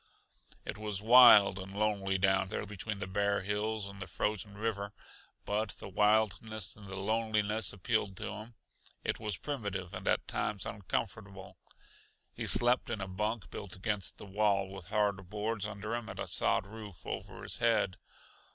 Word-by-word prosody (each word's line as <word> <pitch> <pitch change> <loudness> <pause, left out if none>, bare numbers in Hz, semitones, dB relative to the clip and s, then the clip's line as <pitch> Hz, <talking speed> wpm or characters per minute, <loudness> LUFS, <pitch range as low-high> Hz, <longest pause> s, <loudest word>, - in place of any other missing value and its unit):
It 110 - -5
was 105 -2 -1
wild 115 -5 +8
and 95 +1 -8
lonely 100 -2 +1
down 95 0 +3
there 105 - -3
between 105 +1 -5
the 100 - -4
bare 100 +1 0
hills 105 +1 -2
and 100 0 -10
the 95 - -5
frozen 105 +4 -2
river, 105 -2 -3 0.5
but 105 0 -1
the - - -9
wildness 105 0 +1
and 105 -2 -13
the 95 - -6
loneliness 110 0 +1
appealed 100 -1 -1
to - - -4
him. 110 +3 -9 0.5
It - - -1
was 105 -5 -3
primitive 100 -11 -4
and - - -6
at - - +1
times 105 -3 -2
uncomfortable. 100 0 -4 0.8
He - - -4
slept 120 +1 +6
in 115 - -2
a 95 - -4
bunk 105 +3 -3
built 100 -3 -6
against 100 0 -1
the - - -10
wall, 100 -1 +1
with 95 -3 -9
hard 100 -3 0
boards 105 0 -2
under 105 +1 -5
him 120 -1 -3
and - - -8
a - - -2
sod - - +1
roof 105 -3 -10
over - - -6
his - - -3
head. 115 -5 +2
105 Hz, 170 wpm, -32 LUFS, 95-110 Hz, 0.8 s, wild